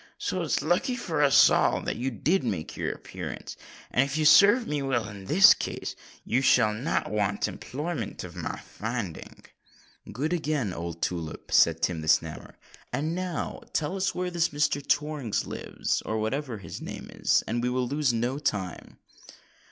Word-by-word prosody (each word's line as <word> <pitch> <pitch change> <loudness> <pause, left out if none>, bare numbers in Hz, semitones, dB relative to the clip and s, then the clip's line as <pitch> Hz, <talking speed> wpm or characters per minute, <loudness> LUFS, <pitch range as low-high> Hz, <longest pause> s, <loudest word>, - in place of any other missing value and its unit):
So - - -2
it's - - 0
lucky 175 +10 +1
for 170 -11 -2
us 140 -2 +7
all - - +3
that - - -2
you 130 +3 -2
did 155 - 0
make 95 -10 -3
your - - -2
appearance; - - -7 0.4
and 130 - +4
if 140 +2 -3
you 155 - +1
serve 205 +9 +7
me 150 -6 -2
well 125 -5 0
in 100 -2 -9
this 185 - +8
case, - - -5 0.3
you 125 - +1
shall 115 -5 +4
not 120 0 -1
want 105 -1 0
employment 150 +5 -5
of - - -9
my - - -4
finding." 110 -6 -6 0.7
"Good 145 - -2
again, 150 - -1
old 85 -1 -5
tulip," 85 -3 -4
said 80 0 +4
Tim 85 -3 0
the 80 - -7
Snammer; 80 0 0 0.4
"and 155 +3 -1
now 180 -2 -3
tell 150 +4 -1
us 195 0 -1
where 180 0 -2
this 170 0 +1
Mr. 145 -1 0
Torrings 145 -7 0
lives—or 110 - -3
whatever 125 +3 -2
his 85 -5 -8
name - - -7
is—and 120 +2 +1
we 125 - 0
will 125 0 0
lose 145 +1 +1
no 120 +4 -1
time." 95 - -3
130 Hz, 165 wpm, -27 LUFS, 105-155 Hz, 0.7 s, this